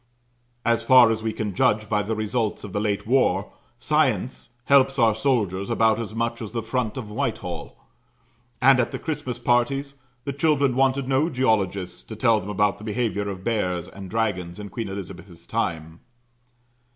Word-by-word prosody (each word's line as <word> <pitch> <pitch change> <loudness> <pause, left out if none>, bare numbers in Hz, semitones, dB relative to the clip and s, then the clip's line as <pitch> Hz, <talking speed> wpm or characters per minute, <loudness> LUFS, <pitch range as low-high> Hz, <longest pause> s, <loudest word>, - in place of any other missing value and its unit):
As 115 -1 +2
far 120 -1 +7
as 110 0 -2
we 110 0 -1
can 110 -2 -4
judge 105 +4 +2
by 105 0 +1
the 110 +2 -2
results 110 0 -2
of 105 - -8
the 105 - 0
late 105 -2 -1
war, 105 -5 +1 0.2
science 130 -6 0 0.2
helps 135 -1 +4
our 115 -3 +4
soldiers 105 -6 0
about 115 -1 +3
as 110 -1 -5
much 115 +1 -2
as 110 -1 -7
the 115 -2 -2
front 120 +1 -2
of 110 -5 -6
Whitehall; 110 -7 -4 0.8
and 130 0 +6
at 120 - +1
the - - -5
Christmas 150 -6 -4
parties, 135 +4 0 0.2
the 140 +1 -3
children 140 -3 +2
wanted 135 0 +2
no 135 +5 +2
geologists 100 - 0
to 110 - -9
tell 115 -1 +3
them 100 - -8
about 105 0 +1
the - - -11
behaviour 110 -2 -1
of 95 -1 -7
bears 90 -6 -1
and 95 0 -10
dragons 100 -5 -2
in 100 -1 -7
Queen 115 +3 -4
Elizabeth's 95 -2 -9
time. 80 0 -3
110 Hz, 175 wpm, -24 LUFS, 100-130 Hz, 0.8 s, far